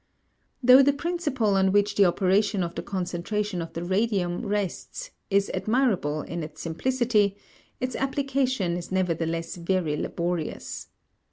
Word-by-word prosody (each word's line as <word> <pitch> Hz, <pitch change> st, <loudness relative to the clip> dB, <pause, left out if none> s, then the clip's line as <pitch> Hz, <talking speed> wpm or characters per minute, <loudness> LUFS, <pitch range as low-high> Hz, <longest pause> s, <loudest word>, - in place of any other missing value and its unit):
Though 255 Hz, +2 st, +9 dB
the 280 Hz, +1 st, +4 dB
principle 290 Hz, -, 0 dB
on 190 Hz, 0 st, +3 dB
which 205 Hz, +1 st, +3 dB
the 200 Hz, -1 st, +5 dB
operation 195 Hz, +2 st, +2 dB
of 170 Hz, -, -4 dB
the -, -, -4 dB
concentration 185 Hz, +1 st, -2 dB
of 165 Hz, -, -7 dB
the 165 Hz, -, -4 dB
radium 190 Hz, 0 st, 0 dB
rests 210 Hz, -, -3 dB, 0.2 s
is 200 Hz, 0 st, +2 dB
admirable 210 Hz, -, +1 dB
in 170 Hz, 0 st, -5 dB
its 155 Hz, -1 st, -8 dB
simplicity, 210 Hz, +2 st, +1 dB, 0.4 s
its 255 Hz, 0 st, -2 dB
application 265 Hz, -9 st, 0 dB
is 175 Hz, -, -7 dB
nevertheless 165 Hz, -2 st, -1 dB
very 170 Hz, -3 st, 0 dB
laborious. 170 Hz, +1 st, -3 dB
195 Hz, 135 wpm, -26 LUFS, 175-240 Hz, 0.4 s, Though